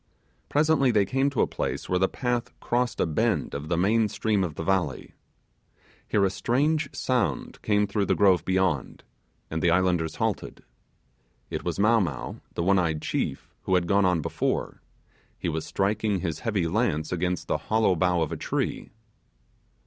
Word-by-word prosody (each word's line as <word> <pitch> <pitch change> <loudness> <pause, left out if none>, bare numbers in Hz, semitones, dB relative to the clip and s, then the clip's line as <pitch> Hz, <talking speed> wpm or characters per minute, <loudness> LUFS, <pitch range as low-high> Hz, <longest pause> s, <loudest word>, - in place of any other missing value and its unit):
Presently 150 -2 +3
they 105 -4 +3
came 135 +7 +1
to 140 - 0
a - - +4
place - - -3
where 90 - +1
the 95 - +3
paths 125 -2 -2
crossed 120 +1 -1
a - - +3
bend 80 -3 0
of 70 +2 -5
the 85 - +1
main 110 +5 +3
stream 105 -1 0
of 80 -5 -3
the - - -4
valley. 95 -1 -1 0.9
Here 100 -1 +2
a 95 - +1
strange 150 +10 +1
sound 105 - -1
came 105 -1 +2
through 100 0 -1
the - - +2
grove 95 -4 +4
beyond, 95 -7 0 0.5
and 80 0 -2
the 85 - +3
Islanders 90 -2 +1
halted. - - -3 0.9
It - - -3
was - - -2
Mow 110 +3 +4
Mow, 95 - -3 0.2
the 85 - -1
one 95 +2 +4
eyed 80 -3 -1
chief, - - -3
who 95 - +2
had 90 -1 +2
gone 100 +2 +3
on 90 -3 +2
before; - - -2 0.6
he 85 - -2
was 80 -1 -3
striking 100 0 0
his 80 -4 -3
heavy 105 -7 -1
lance 80 -5 0
against 90 0 -1
the - - 0
hollow 110 -4 +3
bough 90 0 +2
of 80 - -4
a - - -3
tree. - - -2
95 Hz, 175 wpm, -26 LUFS, 85-110 Hz, 0.9 s, a